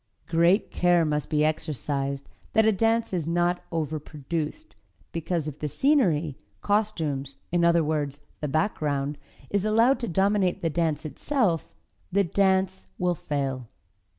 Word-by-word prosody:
Great 170 +5 +3
care 175 -2 +3
must 150 -1 -1
be 150 0 +2
exercised 140 -3 -2 0.3
that 220 0 +5
a 220 - +5
dance 225 +1 +1
is 170 -4 -1
not 175 +1 +1
overproduced, 155 - -4 0.4
because 165 -1 -2
if 150 -1 -6
the 150 - -2
scenery, 170 - +2 0.3
costumes, 160 -10 0 0.2
in 175 0 +2
other 170 -1 +4
words, 150 -2 -1 0.2
the 150 - -2
background, 145 -3 0 0.4
is 200 -1 +1
allowed 225 +5 +4
to 235 - -3
dominate 195 0 +1
the 165 - +1
dance 160 -1 0
itself, 175 - -1 0.4
the 200 +2 +3
dance 190 +1 +1
will 180 -1 +1
fail. 135 -6 -3
165 Hz, 135 wpm, -26 LUFS, 150-195 Hz, 0.4 s, that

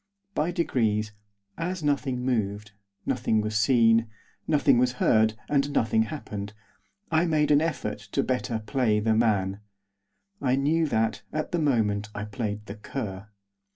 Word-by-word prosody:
By 155 0 0
degrees, 110 - 0 0.5
as 180 0 -3
nothing 135 -4 0
moved, 105 -4 -1 0.3
nothing 120 -4 +1
was 110 0 -2
seen, 115 +1 +4 0.4
nothing 145 -5 +4
was 125 0 +2
heard, 110 -3 +3
and 140 0 +1
nothing 110 -4 +2
happened, 105 -5 -5 0.6
I 160 +2 +3
made 150 -2 +2
an 145 0 +5
effort 155 -10 -2
to - - +2
better 125 -3 -2
play 110 -3 +1
the 110 +1 +2
man. 100 -4 +1 0.8
I 130 -2 +2
knew 155 +4 +2
that, 110 -4 0
at 155 0 -3
the 175 - 0
moment, 110 -8 +1
I 100 +1 -3
played 105 -1 -4
the 100 - -7
cur. 105 -4 -6
115 Hz, 145 wpm, -26 LUFS, 105-145 Hz, 0.8 s, an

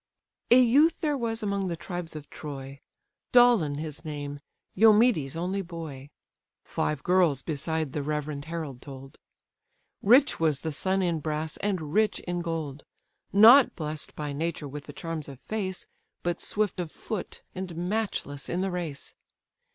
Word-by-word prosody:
A 245 - +8
youth 280 +7 +4
there 300 -2 +1
was 230 -3 -2
among 200 -2 -1
the 170 - -2
tribes 170 0 -6
of 150 -1 -8
Troy, 140 -2 -7 0.5
Dolon 240 -12 +5
his 155 +1 -6
name, 145 -2 -5 0.3
Eumedes' 215 - +4
only 185 +4 -1
boy, 160 -6 -8 0.6
(Five 150 -2 -2
girls 175 -7 +3
beside 160 -1 -2
the 150 - -1
reverend 150 0 -3
herald 160 -6 -5
told.) 135 -1 -11 0.8
Rich 255 +7 +5
was 155 -4 +1
the 160 - -2
son 190 +5 0
in 170 -3 0
brass, 155 +1 -3
and 180 -7 -2
rich 215 +1 +2
in 175 -1 -3
gold; 160 -4 -4 0.5
Not 235 +7 +8
bless'd 155 -2 -5
by 150 -1 -4
nature 155 0 -3
with 145 +1 -8
the 145 - -9
charms 160 -1 -5
of 135 -2 -10
face, 190 -1 -4 0.4
But 175 0 -1
swift 210 -3 -1
of 170 -3 -3
foot, 215 -5 -6
and 185 -2 -5
matchless 175 -6 -2
in 175 - -1
the 190 0 -1
race. 170 -5 -5
165 Hz, 150 wpm, -27 LUFS, 150-195 Hz, 0.8 s, A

